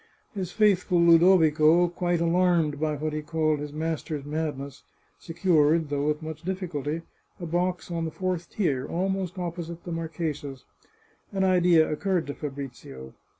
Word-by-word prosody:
His 190 Hz, -4 st, -4 dB
faithful 200 Hz, -4 st, +3 dB
Ludovico, 170 Hz, -1 st, +5 dB
quite 175 Hz, -1 st, -1 dB
alarmed 170 Hz, -3 st, +2 dB
by 155 Hz, -1 st, 0 dB
what 155 Hz, +1 st, -3 dB
he 155 Hz, -, -2 dB
called 155 Hz, -1 st, 0 dB
his 145 Hz, 0 st, -5 dB
master's 155 Hz, -1 st, -3 dB
madness, 145 Hz, -3 st, -4 dB, 0.4 s
secured, 165 Hz, -2 st, +2 dB
though 145 Hz, 0 st, -1 dB
with 150 Hz, +1 st, -1 dB
much 155 Hz, -1 st, -6 dB
difficulty, 165 Hz, -4 st, -3 dB, 0.4 s
a 175 Hz, -, -5 dB
box 175 Hz, +1 st, -2 dB
on 165 Hz, -1 st, -2 dB
the -, -, -2 dB
fourth 180 Hz, 0 st, -3 dB
tier, 140 Hz, -11 st, -1 dB
almost 190 Hz, 0 st, -2 dB
opposite 170 Hz, -1 st, -5 dB
the 175 Hz, -, -7 dB
mar 165 Hz, -1 st, -3 dB
chesa's. 150 Hz, -5 st, -5 dB, 0.7 s
An 195 Hz, -1 st, 0 dB
idea 180 Hz, -3 st, +4 dB
occurred 180 Hz, +2 st, -1 dB
to 145 Hz, -, -5 dB
Fabrizio. 135 Hz, -, -8 dB
165 Hz, 150 wpm, -26 LUFS, 150-175 Hz, 0.7 s, Ludovico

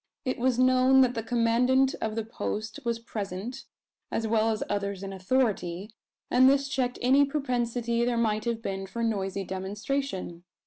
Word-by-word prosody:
It 255 Hz, -, -2 dB
was 250 Hz, 0 st, +2 dB
known 255 Hz, +1 st, +5 dB
that 250 Hz, -1 st, +3 dB
the 230 Hz, -, -2 dB
commandant 245 Hz, +4 st, +2 dB
of 215 Hz, -1 st, -2 dB
the 225 Hz, -1 st, -2 dB
post 220 Hz, -1 st, -4 dB
was 235 Hz, -1 st, -1 dB
present, 220 Hz, +2 st, -6 dB, 0.5 s
as 225 Hz, -, -1 dB
well 220 Hz, 0 st, +2 dB
as 220 Hz, -1 st, -1 dB
others 200 Hz, -1 st, -2 dB
in 195 Hz, 0 st, -5 dB
authority; 195 Hz, -2 st, -1 dB, 0.4 s
and 255 Hz, +1 st, +6 dB
this 275 Hz, 0 st, +2 dB
checked 255 Hz, -4 st, -1 dB
any 270 Hz, +3 st, +5 dB
propensity 245 Hz, -4 st, -1 dB
there 240 Hz, 0 st, 0 dB
might 215 Hz, -1 st, 0 dB
have 230 Hz, -1 st, -2 dB
been 195 Hz, -1 st, -4 dB
for 230 Hz, +5 st, -4 dB
noisy 195 Hz, -3 st, -1 dB
demonstration. 190 Hz, 0 st, -4 dB
230 Hz, 165 wpm, -28 LUFS, 205-255 Hz, 0.5 s, and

